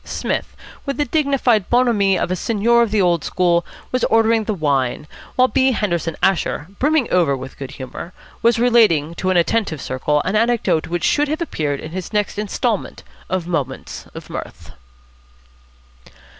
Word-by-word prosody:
Psmith, - - -3 0.3
with 275 -1 -3
the 295 - +1
dignified 260 - +1
bonhomie 225 -6 +3
of - - -1
a - - +1
seigneur 230 +4 +2
of 235 - +2
the 205 -2 +2
old 170 -3 +2
school, 175 -2 +1 0.3
was 255 -1 0
ordering 225 0 +3
the 215 - -1
wine; 140 -4 0 0.3
while 255 0 +5
B. 260 0 +2
Henderson 170 -7 -1
Asher, 175 -5 +1
brimming 295 -2 +2
over 160 -7 +3
with 130 +1 -9
good 135 -2 -7
humour, 130 +6 -8 0.3
was 235 0 +3
relating 220 -11 +3
to 185 +2 -2
an 185 - +3
attentive 170 -2 +1
circle 130 +4 -1
an 190 - -1
anecdote 230 -7 +1
which 175 -1 -3
should 295 0 +2
have 310 +2 -2
appeared 150 - -2
in 155 - -8
his 185 0 -6
next 210 -1 -1
instalment 210 +1 -2 0.3
of 185 -2 -1
"Moments 145 -7 -4
of - - -9
Mirth." - - -8
195 Hz, 165 wpm, -20 LUFS, 165-235 Hz, 0.3 s, while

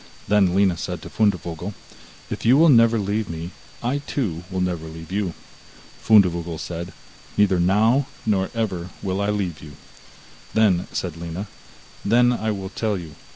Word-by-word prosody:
Then 95 -3 +3
Lina 95 -3 +3
said 85 -1 -5
to - - -9
Fundevogel: 90 -3 -1 0.6
'If - - -4
you 125 +4 +6
will 165 +2 +6
never 115 -3 +6
leave 105 0 -1
me, 85 +2 -5 0.3
I 130 +4 0
too 105 - -3
will 95 -1 -3
never 90 -3 -2
leave 80 +1 -10
you.' 95 -3 -1 0.7
Fundevogel 85 -6 +4
said: 85 +2 -5 0.5
'Neither 100 -3 +4
now, 110 +9 +3 0.2
nor 95 -3 +1
ever 95 -6 -2
will 95 0 -1
I 100 - 0
leave 95 -7 -2
you.' 75 -1 -11 0.8
Then 100 -5 +3
said 85 -3 -3
Lina: 85 +4 -5 0.6
'Then 120 +3 +4
will 110 -5 -2
I - - -5
tell 110 -3 0
you. 85 -4 -8
95 Hz, 155 wpm, -23 LUFS, 85-110 Hz, 0.8 s, you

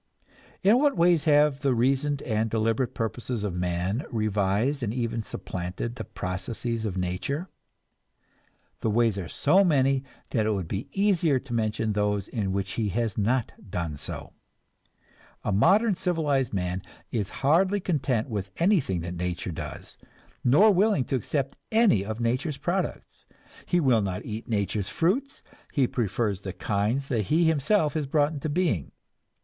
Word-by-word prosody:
In 210 +6 +6
what 285 -1 +2
ways 170 -2 +4
have 150 -2 +4
the 135 -2 +1
reasoned 135 +4 +1
and 110 -1 0
deliberate 115 +3 0
purposes 115 0 -3
of 100 -4 -2
man 90 - -1
revised 110 +5 0
and 110 -4 -1
even 115 -1 -2
supplanted 95 +2 -5
the 120 -2 -6
processes 110 +6 -4
of 95 -3 -3
nature? 95 - -2 1.3
The 110 - 0
ways 110 -2 +2
are 90 - -5
so 185 - +3
many 135 -6 +3 0.3
that 110 -3 +1
it 110 - +2
would 95 -5 -3
be 95 +6 -4
easier 185 -8 +2
to 130 -3 -8
mention 110 -1 0
those 105 -1 0
in 105 -6 -2
which 95 0 -2
he 110 -1 -1
has 115 +2 -1
not 115 +3 +1 0.2
done 85 -4 -3
so. - - -6 1.1
A - - -1
modern 195 - +4
civilized 155 -8 0
man 90 -1 -2 0.3
is 105 -4 -1 0.2
hardly 185 +7 +4
content 140 - 0
with 100 -5 -4
anything 165 - +2
that 85 +1 -5
nature 90 0 -3
does, 80 - -7 0.4
nor 185 - +6
willing 200 -5 +3
to 135 - -2
accept 135 +3 -2 0.2
any 220 - +4
of 110 +2 -5
nature's 130 +6 -1
products. 175 +6 -3 0.4
He 175 - +2
will 130 -8 +3
not 95 -2 -3
eat 110 +1 -6
nature's 100 -2 -1
fruits, 250 +12 0 0.3
he 135 - +3
prefers 105 -4 -1
the 95 -2 -5
kinds 105 - -1
that 115 -5 0
he 165 - +3
himself 160 +2 +2
has 155 -3 -2
brought 145 +2 +2
into 150 +1 -4
being. 145 - 0
120 Hz, 155 wpm, -27 LUFS, 100-150 Hz, 1.3 s, In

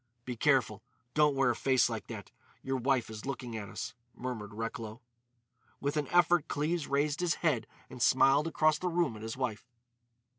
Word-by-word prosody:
"Be 125 - -4
careful. - - +2 0.3
Don't 150 -2 +4
wear 135 -2 +3
a - - -2
face 130 -1 +3
like 115 -3 -5
that. 110 -4 -8 0.3
Your 135 0 -1
wife 130 -1 +1
is 110 +3 -8
looking 125 -3 -4
at 105 -3 -5
us," - - -5 0.2
murmured 120 -5 -5
Recklow. 115 0 -5 0.8
With 140 +1 -1
an 150 -2 0
effort 175 -1 +4
Cleves 155 +2 -1
raised 145 +2 +1
his 180 -2 +1
head 140 -8 +2 0.2
and 125 - -10
smiled 135 +5 +5
across 155 -1 +2
the 180 - -1
room 170 -8 +1
at 105 - -9
his 110 +2 -5
wife. 120 -3 -3
135 Hz, 180 wpm, -31 LUFS, 115-150 Hz, 0.8 s, smiled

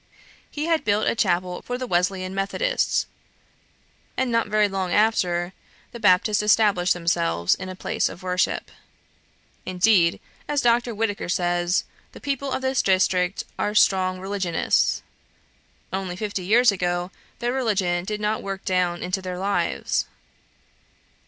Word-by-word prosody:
He 300 +1 -4
had 330 -1 +1
built 210 0 +1
a - - +2
chapel 180 -4 0
for 245 - -4
the 255 - -4
Wesleyan 185 -1 0
Methodists, 200 - 0 1.1
and 260 -2 0
not 230 -1 +1
very 210 0 +3
long 190 -2 -3
after 180 -5 +1 0.4
the 235 - -9
Baptists 205 +1 +3
established 205 -4 +3
themselves 85 - +1
in 185 - -5
a 185 - -6
place - - -1
of 180 - -11
worship. 180 0 -1 0.9
Indeed, 185 -2 +3 0.3
as 295 -1 0
Dr. 240 -1 +2
Whitaker 205 -4 -2
says, 175 0 +1 0.3
the - - -11
people 280 -1 -3
of 265 - -2
this 265 0 +1
district 185 -1 +1 0.2
are 210 - -1
"strong 185 -3 +3
religionists;" 190 -3 0 0.9
only, 190 -2 -3
fifty 200 -1 -4
years 230 +4 +5
ago, 175 -1 -2 0.3
their 240 +1 -2
religion 195 -9 0
did 210 +3 -4
not 210 +1 -1
work 195 -1 -6
down 180 -2 0
into 185 +2 -2
their 185 -1 -5
lives. 200 +2 -1
195 Hz, 140 wpm, -24 LUFS, 180-220 Hz, 1.1 s, years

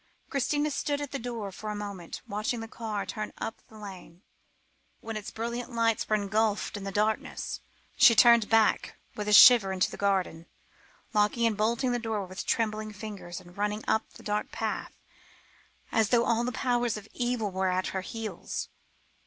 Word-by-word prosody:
Christina 290 +2 0
stood 285 0 -1
at 290 -2 -5
the 275 - -3
door 230 -4 -5
for 215 +3 -7
a 210 - -3
moment, 200 -5 -6
watching 215 +4 -2
the 225 - -6
car 215 -3 -4
turn 215 +3 -5
up 225 - -5
the 220 - -15
lane, 190 -3 -11 0.8
but - - -24
when 225 - -3
its 210 -2 -5
brilliant 235 +2 -4
lights 230 -1 +1
were 215 - +4
engulfed 210 +1 0
by 205 - -5
the 195 0 -4
darkness, 215 +2 -1 0.4
she 230 - +8
turned 235 -2 +6
back 225 -1 +3 0.2
with 210 -1 -4
a - - +1
shiver 215 -2 +9
into 185 -1 +1
the - - -7
garden, 185 -4 0 0.7
locking 210 +2 +2
and 225 -2 +2
bolting 235 +5 +1
the 245 - 0
door 220 -4 -2
with 185 +1 -7
trembling 215 -1 0
fingers, 205 -4 -7
and 175 +1 -16
running 210 +1 -1
up 220 - +1
the - - -14
dark 210 0 -2
path - - -3 1.0
as 220 -2 +2
though 240 -1 +4
all 230 0 +2
the 250 - -1
powers 245 -2 0
of 210 0 -10
evil 240 -4 -1
were 190 0 0
at 185 0 0
her 190 - -1
heels. 190 - -5
215 Hz, 185 wpm, -29 LUFS, 200-235 Hz, 1.0 s, shiver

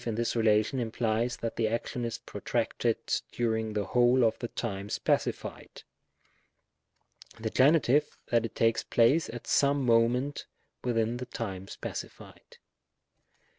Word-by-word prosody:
in 115 -2 -2
this 120 +1 -1
relation 110 +3 +2
implies 115 0 -1
that 115 - -4
the 115 - +2
action 120 +2 -2
is 115 - -3
protracted - - -2 0.3
during 110 -2 -1
the 105 -1 -1
whole 125 +1 +4
of 115 -1 +3
the 120 - -3
time 100 -4 -4
specified; - - -2 1.6
the 110 -1 -3
Gen., 135 +4 +5
that 145 -5 +1
it 115 - -5
takes 115 0 +2
place 130 +8 +3
at 120 0 -7
some 140 -1 +2
moment 120 +4 +2 0.4
within 115 -1 0
the 125 0 -6
time 95 -6 -5
specified. - - -9
115 Hz, 130 wpm, -29 LUFS, 110-125 Hz, 1.6 s, Gen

